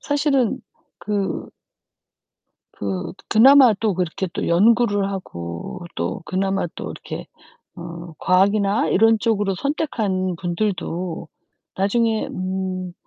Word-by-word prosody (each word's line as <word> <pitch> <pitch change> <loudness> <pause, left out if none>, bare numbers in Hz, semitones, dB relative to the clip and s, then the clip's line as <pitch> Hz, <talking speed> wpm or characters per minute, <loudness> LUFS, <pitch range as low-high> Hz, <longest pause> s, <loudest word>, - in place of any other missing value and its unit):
사실은 285 -5 +1 0.4
그 200 -3 -2 1.2
그 95 -2 -4 0.2
그나마 255 +1 +7
또 215 -4 +1
그렇게 180 +1 -2
또 - - -2
연구를 205 +2 +3
하고 85 - -6
또 85 - -3
그나마 195 +1 -1
또 - - -6
이렇게 - - -7 0.5
어 170 -1 -8
과학이나 200 +3 +2
이런 225 +2 +4
쪽으로 205 -3 +1
선택한 200 - -1
분들도 175 -2 -3 0.5
나중에 220 +3 +1
음 185 -1 -4
195 Hz, 210 characters per minute, -22 LUFS, 180-220 Hz, 1.2 s, 그나마